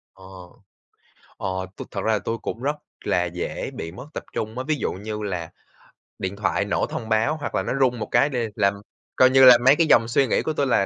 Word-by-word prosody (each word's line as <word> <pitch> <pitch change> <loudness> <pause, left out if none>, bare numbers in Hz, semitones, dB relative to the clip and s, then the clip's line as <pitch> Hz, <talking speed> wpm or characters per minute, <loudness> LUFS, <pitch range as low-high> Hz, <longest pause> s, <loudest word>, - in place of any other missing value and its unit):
Ờ, 95 - -17 1.1
ờ, - - -4 0.3
tôi - - -8
thật - - -3
ra 110 - +2
là 105 - +1
tôi 115 +4 -3
cũng - - -5
rất 145 +3 0 0.3
là 90 - +1
dễ 85 0 -4
bị 80 - -6
mất 95 - -10
tập - - -5
trung 110 +2 -4
á, 130 - -2
ví 155 - +2
dụ - - -2
như 105 +3 -6
là 90 -5 -4 0.7
điện 95 +1 -3
thoại 100 0 0
nổ 100 - 0
thông 110 - -6
báo 115 +8 +1
hoặc 145 - -4
là - - +1
nó - - -2
rung 125 -3 +2
một - - -4
cái 145 - +4
đê 120 -5 -2
là 100 -3 +3 0.4
coi 130 - +6
như 135 +1 +5
là, 125 -1 +10
mấy 135 +2 +7
cái 165 +1 +2
dòng 115 -6 +5
suy 130 +3 +2
nghĩ - - +1
của 155 - -2
tôi 140 -2 0
là 100 -6 +2
115 Hz, 245 wpm, -23 LUFS, 100-130 Hz, 1.1 s, là